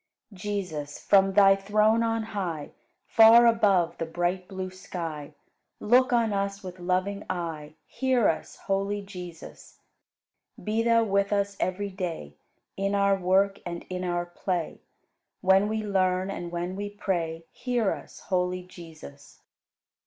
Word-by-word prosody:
108. 190 Hz, -3 st, -14 dB
Jesus, 180 Hz, -8 st, -4 dB
from 195 Hz, -1 st, +4 dB
Thy 195 Hz, -1 st, +7 dB
throne 210 Hz, +3 st, +2 dB
on 225 Hz, -1 st, 0 dB
high, 185 Hz, -9 st, -4 dB, 0.3 s
Far 230 Hz, +1 st, +7 dB
above 200 Hz, -7 st, +3 dB
the 165 Hz, -, -2 dB
bright 175 Hz, +2 st, -2 dB
blue 185 Hz, -1 st, -5 dB
sky, 165 Hz, -6 st, -7 dB, 0.4 s
Look 250 Hz, +4 st, +4 dB
on 230 Hz, -3 st, +2 dB
us 200 Hz, 0 st, -2 dB
with 185 Hz, -1 st, -8 dB
loving 185 Hz, +3 st, -1 dB
eye; 160 Hz, -4 st, -4 dB
Hear 260 Hz, -4 st, +1 dB
us, -, -, -2 dB
holy 200 Hz, +1 st, -2 dB
Jesus! 180 Hz, -4 st, -10 dB, 0.9 s
Be 215 Hz, +4 st, 0 dB
Thou 230 Hz, 0 st, +4 dB
with 200 Hz, -1 st, +1 dB
us 200 Hz, -1 st, 0 dB
every 200 Hz, +2 st, -2 dB
day, 170 Hz, -, -5 dB, 0.4 s
In 195 Hz, +1 st, -1 dB
our 200 Hz, 0 st, +3 dB
work 195 Hz, +2 st, +2 dB
and 170 Hz, -1 st, -6 dB
in 180 Hz, 0 st, -3 dB
our 175 Hz, -1 st, -1 dB
play, 175 Hz, -1 st, -4 dB, 0.6 s
When 190 Hz, +2 st, +4 dB
we 220 Hz, 0 st, -2 dB
learn 185 Hz, -2 st, +1 dB
and 175 Hz, -3 st, -6 dB
when 175 Hz, +2 st, -3 dB
we 205 Hz, +1 st, -4 dB
pray; 170 Hz, -5 st, -3 dB
Hear 240 Hz, -5 st, -1 dB
us, -, -, -8 dB
holy 180 Hz, -1 st, -1 dB
Jesus! 160 Hz, -5 st, -13 dB
195 Hz, 140 wpm, -27 LUFS, 175-205 Hz, 0.9 s, Thy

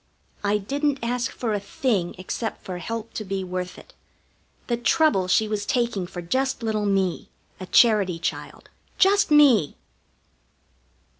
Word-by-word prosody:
I 205 Hz, +1 st, +2 dB
didn't 280 Hz, +7 st, -1 dB
ask 245 Hz, +2 st, -1 dB
for 230 Hz, -3 st, -3 dB
a 205 Hz, -, 0 dB
thing 200 Hz, -3 st, -1 dB
except 205 Hz, +5 st, -5 dB
for 180 Hz, -1 st, -6 dB
help 230 Hz, +4 st, -5 dB
to 215 Hz, -, -4 dB
be 195 Hz, -1 st, -3 dB
worth 180 Hz, 0 st, -5 dB
it -, -, -15 dB, 0.7 s
the 240 Hz, -, 0 dB
trouble 240 Hz, -, +2 dB
she 215 Hz, +4 st, +3 dB
was 210 Hz, -1 st, -2 dB
taking 235 Hz, -5 st, -1 dB
for 175 Hz, -1 st, -7 dB
just 260 Hz, +7 st, -1 dB
little 215 Hz, -2 st, -1 dB
me, 190 Hz, -3 st, 0 dB, 0.3 s
a 185 Hz, -, -7 dB
charity 205 Hz, -7 st, +4 dB
child. 165 Hz, -, -5 dB, 0.3 s
Just 400 Hz, +1 st, +4 dB
me! 270 Hz, -, +5 dB
215 Hz, 145 wpm, -24 LUFS, 185-245 Hz, 0.7 s, me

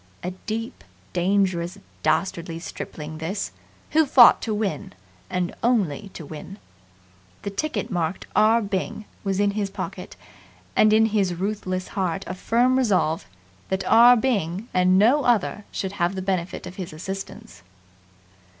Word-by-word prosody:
A 180 Hz, -, -2 dB, 0.2 s
deep, 225 Hz, +1 st, -4 dB, 0.3 s
dangerous, 185 Hz, -1 st, +1 dB, 0.2 s
dastardly 170 Hz, -, 0 dB
stripling 155 Hz, -2 st, -7 dB
this, 190 Hz, +6 st, -3 dB, 0.4 s
who 315 Hz, -1 st, +4 dB
fought 250 Hz, -3 st, +8 dB
to 225 Hz, -, -3 dB
win 205 Hz, -2 st, -2 dB, 0.4 s
and 180 Hz, -1 st, -1 dB
only 205 Hz, -, +1 dB
to 160 Hz, -, -7 dB
win. 160 Hz, +6 st, -9 dB, 0.9 s
The 200 Hz, -, -3 dB
ticket 305 Hz, +7 st, -3 dB
marked 175 Hz, -1 st, -2 dB
"R. 225 Hz, +2 st, +4 dB
Byng" 200 Hz, +1 st, -3 dB, 0.2 s
was 195 Hz, -1 st, -1 dB
in 205 Hz, 0 st, +3 dB
his 200 Hz, -1 st, -2 dB
pocket, 195 Hz, -, -6 dB, 0.6 s
and 215 Hz, -, +5 dB
in 220 Hz, +1 st, +5 dB
his 200 Hz, -5 st, +1 dB
ruthless 185 Hz, -1 st, -3 dB
heart 190 Hz, -1 st, -2 dB
a -, -, -4 dB
firm 245 Hz, +7 st, +2 dB
resolve 180 Hz, -, +1 dB, 0.4 s
that 190 Hz, 0 st, -1 dB
R. 240 Hz, +2 st, +7 dB
Byng 215 Hz, -4 st, -1 dB
and 185 Hz, 0 st, +4 dB
no 245 Hz, +9 st, +4 dB
other 210 Hz, -3 st, +1 dB
should 190 Hz, -, -3 dB
have 180 Hz, -1 st, -1 dB
the 190 Hz, -, -3 dB
benefit 185 Hz, -2 st, -2 dB
of 180 Hz, -, -9 dB
his 180 Hz, -5 st, -6 dB
assistance. 195 Hz, -, -7 dB
195 Hz, 140 wpm, -24 LUFS, 180-220 Hz, 0.9 s, fought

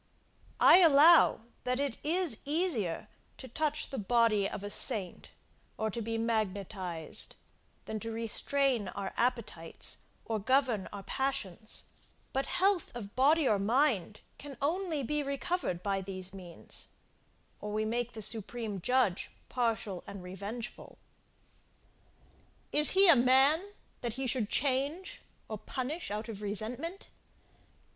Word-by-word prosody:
I -, -, +8 dB
allow 325 Hz, -4 st, +7 dB, 0.2 s
that 250 Hz, +1 st, -1 dB
it 280 Hz, -4 st, -2 dB
is 330 Hz, -5 st, +1 dB
easier 280 Hz, -, 0 dB, 0.3 s
to 260 Hz, -, -9 dB
touch 300 Hz, +5 st, -1 dB
the 270 Hz, -, -3 dB
body 215 Hz, -2 st, +2 dB
of 205 Hz, -, -7 dB
a 205 Hz, -, -5 dB
saint, 205 Hz, -9 st, -1 dB, 0.5 s
or 220 Hz, 0 st, -1 dB
to 230 Hz, -, -4 dB
be 225 Hz, +1 st, -3 dB
magnetised, 195 Hz, -6 st, -2 dB, 0.5 s
than 220 Hz, -, -4 dB
to 225 Hz, +1 st, -5 dB
restrain 230 Hz, +1 st, +1 dB
our 195 Hz, -1 st, -5 dB
appetites 220 Hz, -9 st, -1 dB, 0.3 s
or 220 Hz, -1 st, -2 dB
govern 250 Hz, -2 st, +1 dB
our 200 Hz, -1 st, -8 dB
passions; 215 Hz, -7 st, -2 dB, 0.5 s
but 270 Hz, 0 st, -1 dB
health 380 Hz, -1 st, +1 dB
of 210 Hz, -4 st, -8 dB
body 290 Hz, +3 st, +4 dB
or 210 Hz, -4 st, +2 dB
mind 220 Hz, -, +1 dB, 0.2 s
can 280 Hz, -3 st, -9 dB
only 320 Hz, 0 st, -1 dB
be 300 Hz, +4 st, -1 dB
recovered 280 Hz, -, -2 dB
by 195 Hz, -1 st, -1 dB
these 185 Hz, -1 st, -5 dB
means, 180 Hz, -3 st, -3 dB, 0.7 s
or 210 Hz, -, -6 dB
we 215 Hz, +1 st, -1 dB
make 240 Hz, +2 st, -2 dB
the 220 Hz, -, -3 dB
Supreme 220 Hz, -2 st, -2 dB
Judge 250 Hz, -5 st, +1 dB, 0.2 s
partial 225 Hz, -7 st, -1 dB
and 200 Hz, -2 st, -8 dB
revengeful. 200 Hz, +6 st, -7 dB, 1.7 s
Is 300 Hz, 0 st, +6 dB
he 390 Hz, +1 st, +7 dB
a 335 Hz, -, +9 dB
man, 275 Hz, +10 st, +4 dB, 0.3 s
that 240 Hz, -2 st, -3 dB
he 265 Hz, +3 st, -3 dB
should 240 Hz, -4 st, 0 dB
change, 285 Hz, +7 st, 0 dB, 0.3 s
or 215 Hz, -2 st, -6 dB
punish 265 Hz, -, -4 dB
out 210 Hz, +2 st, -4 dB
of 215 Hz, -3 st, -7 dB
resentment? 230 Hz, -, -2 dB
235 Hz, 130 wpm, -31 LUFS, 205-280 Hz, 1.7 s, a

